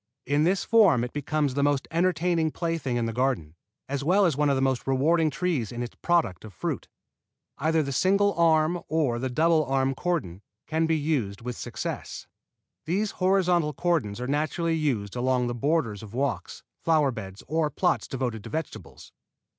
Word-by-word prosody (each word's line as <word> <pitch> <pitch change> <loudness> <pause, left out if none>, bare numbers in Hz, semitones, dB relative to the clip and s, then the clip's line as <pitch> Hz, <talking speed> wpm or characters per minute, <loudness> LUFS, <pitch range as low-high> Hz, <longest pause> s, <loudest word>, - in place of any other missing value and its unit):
In 145 +2 +2
this 185 +2 +2
form 195 - +5
it 125 - -5
becomes 145 -1 -1
the 140 - 0
most 145 -1 +1
entertaining 170 -1 +1
plaything 165 -7 -2
in 120 - 0
the 115 - -3
garden, 125 - -1 0.3
as 140 0 -3
well 190 +6 +4
as 165 -6 +2
one 150 +1 +2
of 140 - +3
the - - 0
most 130 -1 0
rewarding 155 +5 +3
trees 145 - -1
in 120 0 -4
its 120 - -7
product 165 - 0
of 105 -5 -11
fruit. - - -3 0.7
Either 160 +2 +2
the 140 - -4
single 200 +7 +3
arm 165 0 +3
or 145 -7 0
the 130 +1 -2
double 160 +4 +3
arm 135 -1 +1
cordon 135 - -2 0.2
can 160 +1 0
be 160 0 +2
used 135 -10 -1
with 125 +1 -5
success. - - -5 0.6
These 195 +6 0
horizontal 180 -4 +2
cordons 150 -14 0
are 125 - -3
naturally 155 +4 0
used 125 -11 -1
along 125 0 +1
the 120 - -2
borders 120 -5 0
of 110 0 -10
walks, 140 +1 -2 0.2
flower 155 -4 +2
beds 100 -4 -8
or 155 +1 +1
plots - - 0
devoted 120 -5 -3
to - - -7
vegetables. 160 +4 -6
145 Hz, 180 wpm, -26 LUFS, 125-165 Hz, 0.7 s, form